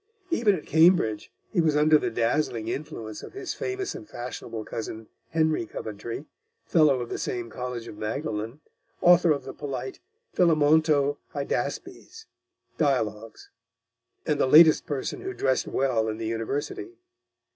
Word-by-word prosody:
Even 225 Hz, -11 st, +3 dB
at 155 Hz, -, -8 dB
Cambridge, 160 Hz, -, +3 dB, 0.2 s
he 180 Hz, -, +2 dB
was 155 Hz, -2 st, +2 dB
under 150 Hz, +1 st, +5 dB
the -, -, -1 dB
dazzling 115 Hz, -2 st, 0 dB
influence 115 Hz, -6 st, -5 dB
of -, -, -10 dB
his 395 Hz, -1 st, -5 dB
famous 390 Hz, 0 st, -3 dB
and 330 Hz, -5 st, -10 dB
fashionable 115 Hz, -2 st, -6 dB
cousin, 110 Hz, 0 st, -6 dB, 0.2 s
Henry 155 Hz, -7 st, +1 dB
Coventry, 115 Hz, +7 st, -6 dB, 0.4 s
fellow 150 Hz, -6 st, +4 dB
of 120 Hz, -, -5 dB
the -, -, -4 dB
same 120 Hz, -2 st, -4 dB
college 125 Hz, -1 st, -5 dB
of 105 Hz, -, -10 dB
Magdalen, 110 Hz, +2 st, -4 dB, 0.4 s
author 175 Hz, 0 st, +6 dB
of 145 Hz, -, 0 dB
the -, -, -8 dB
polite 145 Hz, -, -5 dB, 0.4 s
Philémonto 155 Hz, -3 st, +3 dB, 0.2 s
Hydaspes 295 Hz, -, -4 dB, 0.5 s
dialogues, 115 Hz, -7 st, -1 dB, 0.7 s
and 150 Hz, -2 st, 0 dB
the -, -, +3 dB
latest 155 Hz, +5 st, +7 dB
person 145 Hz, -5 st, -3 dB
who 385 Hz, 0 st, -5 dB
dressed 130 Hz, -1 st, +1 dB
well 120 Hz, -5 st, +1 dB
in 110 Hz, -, -4 dB
the 115 Hz, -, -4 dB
University. 145 Hz, -, -4 dB
145 Hz, 140 wpm, -26 LUFS, 115-160 Hz, 0.7 s, latest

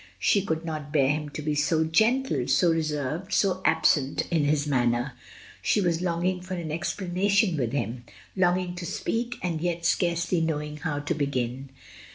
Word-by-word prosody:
She 200 Hz, -, +3 dB
could 160 Hz, -3 st, -2 dB
not 155 Hz, -3 st, -5 dB
bear 140 Hz, -3 st, +3 dB
him 150 Hz, 0 st, -1 dB
to 150 Hz, +1 st, -6 dB
be 150 Hz, 0 st, 0 dB
so 155 Hz, +2 st, +2 dB
gentle, 220 Hz, -, +2 dB
so 165 Hz, +6 st, +4 dB
reserved, 155 Hz, +3 st, -2 dB
so 185 Hz, -1 st, +2 dB
absent 145 Hz, -4 st, +2 dB
in 160 Hz, -4 st, +2 dB
his 145 Hz, 0 st, +1 dB
manner; 125 Hz, -2 st, +1 dB, 0.5 s
she -, -, +2 dB
was 170 Hz, -3 st, +1 dB
longing 180 Hz, +1 st, 0 dB
for 185 Hz, +1 st, -5 dB
an 165 Hz, -3 st, -4 dB
ex 160 Hz, +1 st, -2 dB
planation 195 Hz, +1 st, +1 dB
with 120 Hz, -6 st, -1 dB
him, 120 Hz, -2 st, -3 dB, 0.3 s
longing 180 Hz, -1 st, +1 dB
to 175 Hz, -, -5 dB
speak 240 Hz, +1 st, -2 dB
and 165 Hz, -3 st, -2 dB
yet 170 Hz, -1 st, -2 dB
scarcely 170 Hz, 0 st, +1 dB
knowing 150 Hz, -2 st, -2 dB
how 150 Hz, -1 st, -3 dB
to 145 Hz, +3 st, -1 dB
begin. 135 Hz, -3 st, -2 dB
160 Hz, 175 wpm, -26 LUFS, 145-180 Hz, 0.5 s, so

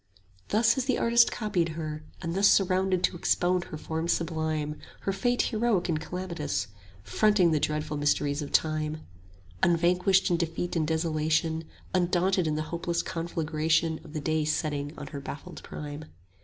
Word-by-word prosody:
Thus 225 Hz, +2 st, +4 dB
has 265 Hz, -, -2 dB
the 260 Hz, -2 st, +1 dB
artist 235 Hz, 0 st, +4 dB
copied 195 Hz, -7 st, 0 dB
her, 155 Hz, -1 st, -4 dB, 0.2 s
and 165 Hz, 0 st, -2 dB
thus 195 Hz, +2 st, +4 dB
Surrounded 185 Hz, -1 st, +3 dB
to -, -, +2 dB
expound 175 Hz, +1 st, +1 dB
her 155 Hz, -, -7 dB
form 160 Hz, +2 st, -3 dB
sublime, 155 Hz, -3 st, -1 dB, 0.2 s
Her 195 Hz, -, -1 dB
fate 245 Hz, +4 st, +1 dB
heroic 215 Hz, -6 st, +1 dB
and 155 Hz, -2 st, 0 dB
calamitous; 170 Hz, -5 st, -3 dB, 0.4 s
45 -, -, -12 dB
Fronting 210 Hz, -5 st, +5 dB
the 155 Hz, -, +2 dB
dreadful 150 Hz, 0 st, -1 dB
mysteries 145 Hz, 0 st, +1 dB
of 145 Hz, -, -6 dB
Time, 155 Hz, 0 st, 0 dB, 0.6 s
Unvanquished 180 Hz, +3 st, +3 dB
in 170 Hz, -, +3 dB
defeat 170 Hz, +1 st, -2 dB
and 155 Hz, -2 st, +1 dB
desolation, 160 Hz, 0 st, 0 dB, 0.3 s
Undaunted 180 Hz, 0 st, +2 dB
in 155 Hz, -, 0 dB
the 155 Hz, -, -1 dB
hopeless 170 Hz, 0 st, -1 dB
conflagration 160 Hz, -1 st, 0 dB
Of 155 Hz, -, -13 dB
the 155 Hz, -, -3 dB
day 155 Hz, +1 st, 0 dB
setting 150 Hz, -1 st, -1 dB
on -, -, -6 dB
her 140 Hz, -2 st, -7 dB
baffled 140 Hz, +1 st, -8 dB
prime. 150 Hz, 0 st, -7 dB
165 Hz, 160 wpm, -28 LUFS, 155-185 Hz, 0.6 s, Fronting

